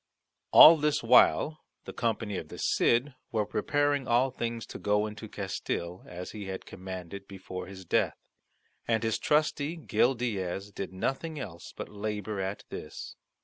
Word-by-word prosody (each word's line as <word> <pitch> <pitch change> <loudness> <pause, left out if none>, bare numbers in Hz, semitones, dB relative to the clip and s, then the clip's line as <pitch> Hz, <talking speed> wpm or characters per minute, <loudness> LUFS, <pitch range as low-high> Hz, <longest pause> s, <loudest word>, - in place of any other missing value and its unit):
All 165 +1 +10
this 150 -1 +1
while 155 0 +5 0.3
the - - -7
company 110 -3 -1
of - - -5
the - - -10
Cid 125 +4 +2 0.2
were 110 -2 +1
preparing 145 0 0
all 125 +3 +3
things 115 -2 -4
to - - -9
go 105 +1 +2
into 110 0 -7
Castille, 90 -3 -4
as 90 +1 -7
he 105 -2 -7
had 95 0 -6
commanded 95 +1 -8
before 95 -2 -7
his 95 -1 -10
death; - - +1 0.7
and 115 -1 +1
his 110 -1 0
trusty 150 +1 +1
Gil 125 - +2
Diaz 100 -4 -3
did 100 -2 -5
nothing 140 - -3
else 90 -10 -8
but - - -5
labour 105 0 -4
at 95 +1 -3
this. - - -8
105 Hz, 155 wpm, -29 LUFS, 95-130 Hz, 0.7 s, All